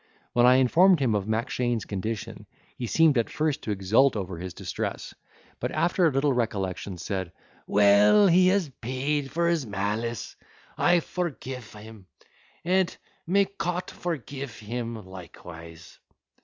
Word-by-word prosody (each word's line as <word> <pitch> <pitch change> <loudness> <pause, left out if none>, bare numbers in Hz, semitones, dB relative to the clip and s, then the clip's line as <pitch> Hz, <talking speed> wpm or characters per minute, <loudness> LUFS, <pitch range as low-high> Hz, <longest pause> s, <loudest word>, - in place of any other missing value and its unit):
When 120 0 +5
I 125 - +7
informed 165 +8 +5
him 130 -5 +1
of 100 -1 -1
Mackshane's 115 +1 -1
condition, 105 +2 -5 0.3
he 120 - -4
seemed 155 -1 +4
at 115 - -1
first 155 -1 -1
to - - -7
exult 105 +7 +3
over 95 -4 -4
his 90 0 -7
distress; - - -5 0.5
but, - - -2
after 175 +1 +2
a - - +1
little 135 +1 +1
recollection, 100 -5 -2
said, 95 0 -4 0.4
"Well, 105 - +5
he 180 0 +5
has 190 -2 +2
paid 135 +4 -2
for 170 +5 0
his 165 -7 0
malice; 105 +3 -3 0.4
I 175 -1 +3
forgife 135 - -5
him, 105 -3 -13 0.6
and 185 0 +1 0.3
may 200 +3 +3
Cot 180 -2 -4
forgife 140 -6 -5
him 115 -1 -5
likewise." 85 -2 -12
120 Hz, 140 wpm, -26 LUFS, 105-160 Hz, 0.6 s, I